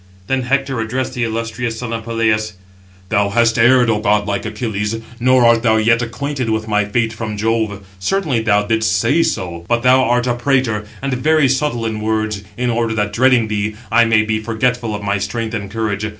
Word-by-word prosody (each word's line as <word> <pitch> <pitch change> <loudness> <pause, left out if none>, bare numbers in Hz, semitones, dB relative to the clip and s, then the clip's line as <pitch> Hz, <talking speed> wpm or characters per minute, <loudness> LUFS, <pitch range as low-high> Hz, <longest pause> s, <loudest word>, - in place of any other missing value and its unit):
Then 135 +5 0
Hector 135 0 -1
addressed 125 +4 -2
the 125 -2 -2
illustrious 115 0 -3
son 115 -1 -5
of 115 -1 -5
Peleus: 110 -2 0 0.6
"Thou 100 0 +1
hast 115 +2 +2
erred, 120 +1 +5
O 110 -2 +1
godlike 105 -1 0
Achilles, 105 -3 -3 0.2
nor 130 0 +4
art 115 -1 +4
thou 110 -2 +3
yet 115 +2 +3
acquainted 125 +2 -3
with 110 0 -1
my 105 -1 +1
fate 115 +2 -1
from 110 -2 -5
Jove; 110 -2 -1
certainly 150 - 0
thou 105 -2 +2
didst 110 -3 +1
say 155 +11 +2
so, 85 - -2
but 120 0 0
thou 130 +1 +5
art 125 0 +1
a 125 - +1
prater, 120 -4 0 0.2
and 135 -1 -1
very 150 +3 +3
subtle 130 -3 -1
in 110 -1 -3
words, 110 -2 -1
in 125 0 0
order 115 -1 -1
that, 105 -1 -1
dreading 125 -1 +3
thee, 105 0 -2 0.2
I 115 +1 +5
may 110 -1 +3
be 110 0 -1
forgetful 115 0 -1
of 105 - -6
my 100 0 0
strength 110 +3 -3
and 100 -3 -4
courage. 105 -1 -2
115 Hz, 195 wpm, -17 LUFS, 110-125 Hz, 0.6 s, erred